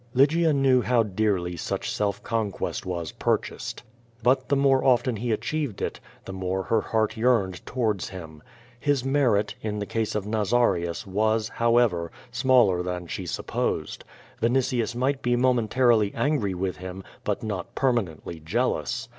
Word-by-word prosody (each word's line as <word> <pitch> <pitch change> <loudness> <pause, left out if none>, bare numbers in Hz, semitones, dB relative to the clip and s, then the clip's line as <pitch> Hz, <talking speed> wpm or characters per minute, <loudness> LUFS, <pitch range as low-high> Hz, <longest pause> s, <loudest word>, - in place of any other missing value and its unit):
Lygia 155 +5 +4
knew 135 -3 +4
how 120 -1 +3
dearly 95 -4 0
such 85 - -3
self 105 0 -1
conquest 110 -5 -2
was 85 -3 -3
purchased. - - -2 0.4
But 130 +1 +2
the 140 - +3
more 135 -1 +3
often 125 -1 +3
lie 120 +2 -2
achieved 140 0 -2
it, - - -3 0.3
the 95 - -6
more 95 0 -2
her 110 +3 +1
heart 110 -1 0
yearned 110 -6 +1
towards 110 -7 -1
him. 80 -5 -9 0.4
His 140 -1 +1
merit, 135 -7 +2
in 105 -1 -3
the 105 - -3
case 110 0 -2
of 105 -2 -1
Nazarius 105 -5 +1
was, 110 +3 +1
however, 115 -9 +2 0.2
smaller 120 -7 +4
than 90 0 -4
she 90 +2 -5
sup])osed. 85 - -2 0.4
Vinitius 120 -1 +1
might 135 +2 0
be 120 0 +1
momentarily 120 -3 +3
angry 115 -6 0
with 90 0 -2
him, 95 +1 -7 0.2
but - - -2
not 100 -5 -4
permanently 95 - -1
jealous. 115 +6 -1
110 Hz, 145 wpm, -26 LUFS, 95-125 Hz, 0.4 s, Lygia